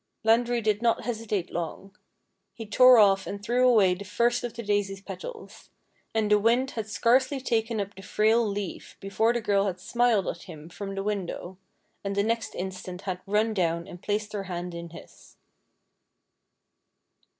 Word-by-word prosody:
Landry 235 +2 +3
did 215 -1 0
not 235 -1 +1
hesitate 220 -6 -3
long. 175 +4 -5 0.6
He 225 - -7
tore 250 +4 +7
off 195 -3 +4
and 200 - -5
threw 250 +3 +3
away 200 -6 +5
the 185 +3 -7
first 235 +4 +1
of 240 -1 -5
the 235 - -6
daisy's 205 -2 -1
petals; 465 - -9 0.4
and 220 -2 0
the 210 - +6
wind 240 +5 +2
had 220 -2 -4
scarcely 260 +5 +2
taken 225 -3 -1
up 200 0 -3
the 195 - -12
frail 220 +4 +2
leaf 205 -3 -5
before 220 +4 +1
the 240 0 -1
girl 200 -1 +2
had 185 -2 -3
smiled 235 0 +1
at 170 - -4
him 155 -1 -10
from 195 +2 -6
the 195 - -3
window, 190 -2 -4 0.4
and 200 0 -3
the 200 - +2
next 230 +1 -2
instant 185 0 -6
had 185 -2 -4
run 215 +2 +1
down 170 -3 0
and 175 - -11
placed 210 0 -2
her 200 -2 -3
hand 175 -1 -5
in 170 0 -7
his. 165 - -15
210 Hz, 170 wpm, -27 LUFS, 195-230 Hz, 0.6 s, tore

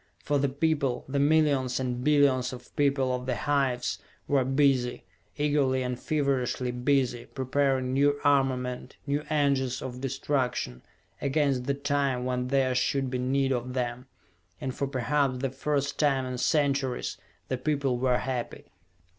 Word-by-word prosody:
For 145 -1 0
the 140 0 +1
people, 140 -3 0
the 140 +1 -1
millions 140 -4 +3
and 125 -1 -2
billions 140 -3 +3
of 125 0 -11
people 135 -3 +2
of 125 0 -4
the 125 - 0
hives, 135 -4 0 0.3
were 140 -2 +3
busy, 135 -2 +2 0.3
eagerly 145 -3 +2
and 125 0 -3
feverishly 135 -4 0
busy, 125 -1 0
preparing 130 -1 0
new 145 +1 +3
armament, 130 -3 +1
new 145 +1 -1
engines 140 -4 +1
of 130 -2 -6
destruction, 130 - -2 0.4
against 140 -3 +1
the 140 +1 0
time 140 -3 0
when 125 0 -1
there 130 -1 +2
should 130 +1 0
be 125 - -1
need 135 +2 +1
of 125 0 -2
them. 125 0 -3 0.5
And 130 -3 -3
for 140 - -2
perhaps 135 0 0
the 130 0 -2
first 140 +1 -1
time 135 -3 +2
in 125 -1 -4
centuries, 140 -2 0 0.3
the 130 - -2
people 140 -3 0
were 125 -1 +2
happy. 125 -2 -4
135 Hz, 145 wpm, -28 LUFS, 125-140 Hz, 0.5 s, millions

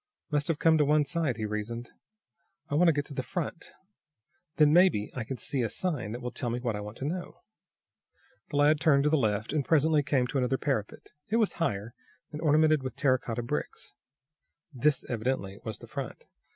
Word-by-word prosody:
"Must 145 -1 +1
have 165 - 0
come 160 0 +4
to - - +5
one 150 +1 +3
side," 155 -6 -1
he 110 - -2
reasoned. 110 +3 -4 0.8
"I - - -4
want 170 +4 +4
to - - +7
get 145 -2 -1
to 145 - -7
the 130 - -2
front. 170 +5 -5 0.8
Then, 150 -1 +5
maybe, 175 - +4
I 125 - -2
can 130 +3 -5
see 130 +4 -2
a 115 - 0
sign 145 - -2
that 120 +2 -5
will 125 0 -4
tell 120 - -3
me 120 +1 -2
what 120 -3 -2
I - - -4
want 105 +2 -8
to 135 - -5
know." 175 +4 -5 1.1
The - - -5
lad 145 +1 +4
turned 145 -3 +4
to 150 - +2
the - - +4
left, 110 -3 0
and, 150 -2 +1
presently 155 +1 +3
came 135 -3 +1
to 135 +2 -1
another 130 +1 +1
parapet. 130 -9 -3 0.2
It 215 - +1
was 225 -3 +2
higher, 110 -6 -1 0.4
and 150 0 -6
ornamented 155 -1 +4
with 130 -2 -5
terra 130 -3 +2
cotta 120 0 -4
bricks. 120 - -4 0.8
This, 140 +2 +1
evidently, 110 -4 -2
was 110 - -5
the 120 - -13
front. 125 +3 -6
135 Hz, 205 wpm, -29 LUFS, 120-155 Hz, 1.1 s, to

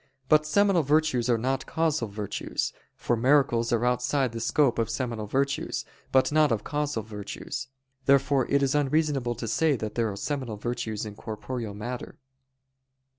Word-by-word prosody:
But 155 0 +5
seminal 195 +1 +4
virtues 145 -4 +2
are 120 - +4
not 130 +4 -1
causal 160 -7 0
virtues: 100 0 -3 0.2
for 120 - 0
miracles 120 -1 +3
are 120 0 +2
outside 125 +1 +1
the 115 - -5
scope 125 +1 +2
of 115 - 0
seminal 115 -5 -3
virtues, 140 +5 -1 0.3
but 130 +1 +4
not 155 -2 +4
of 110 -2 0
causal 150 -6 -2
virtues. 105 -2 -6 0.4
Therefore 140 -1 +4
it 140 0 +3
is 135 - +2
unreasonable 145 -4 +1
to 115 0 -5
say 155 +6 +2
that 110 -3 -4
there 115 -2 0
are - - -6
seminal 130 -4 -3
virtues 110 -1 -3
in 105 - -6
corporeal 110 +1 -5
matter. 120 +4 -6
125 Hz, 160 wpm, -27 LUFS, 115-145 Hz, 0.4 s, But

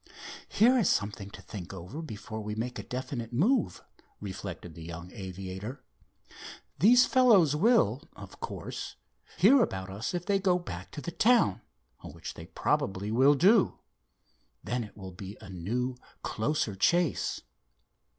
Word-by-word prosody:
"Here 250 +4 +5
is 205 - +3
something 100 -1 -1
to - - -12
think 95 -5 -8
over 95 - -7
before 110 -6 -7
we 105 0 -4
make 120 +3 -3
a - - -5
definite 125 -2 -5
move," 195 - +1 0.4
reflected 95 -4 -7
the 85 - -11
young 85 +2 -8
aviator. 95 +5 -7 1.0
"These 245 +6 +7
fellows 215 - +5
will, 155 - +3
of - - -12
course, - - -6 0.4
hear 245 +9 +6
about 95 - -2
us 105 - -3
if 175 0 -3
they 200 -1 +2
go 185 -2 +3
back 90 - -7
to 150 - -6
the 170 - -5
town, 220 - +3 0.4
which - - -8
they - - -10
probably 95 +2 -1
will 135 +5 +5
do. 195 +7 +4 0.9
Then 120 +1 -2
it 105 - -12
will 95 -2 -8
be 95 +3 -8
a 95 - -11
new, 120 +8 -2 0.3
closer 110 -1 -1
chase." 170 - +1
120 Hz, 145 wpm, -29 LUFS, -, 1.0 s, These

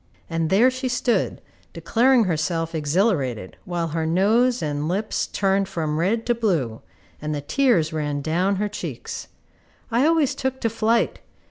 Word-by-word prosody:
And 165 -1 0
there 230 +8 +5
she 255 0 -3
stood, 245 -1 0 0.3
declaring 245 +1 +3
herself 165 -2 -1
exhilarated, 150 - 0
while 170 -2 -2
her 160 +1 -2
nose 225 +9 +2
and 145 0 -2
lips 200 +5 -1
turned 195 0 +1
from 155 -2 -2
red 220 +7 0
to 240 - +2
blue, 170 - -1 0.4
and 150 0 -2
the 145 - -3
tears 170 - +2
ran 145 -2 -2
down 180 +6 +1
her 210 +2 -1
cheeks. 205 - -6 0.6
I 245 +6 +3
always 320 -4 +3
took 265 0 -3
to 230 - 0
flight. 225 +1 +1
190 Hz, 150 wpm, -23 LUFS, 155-230 Hz, 0.6 s, there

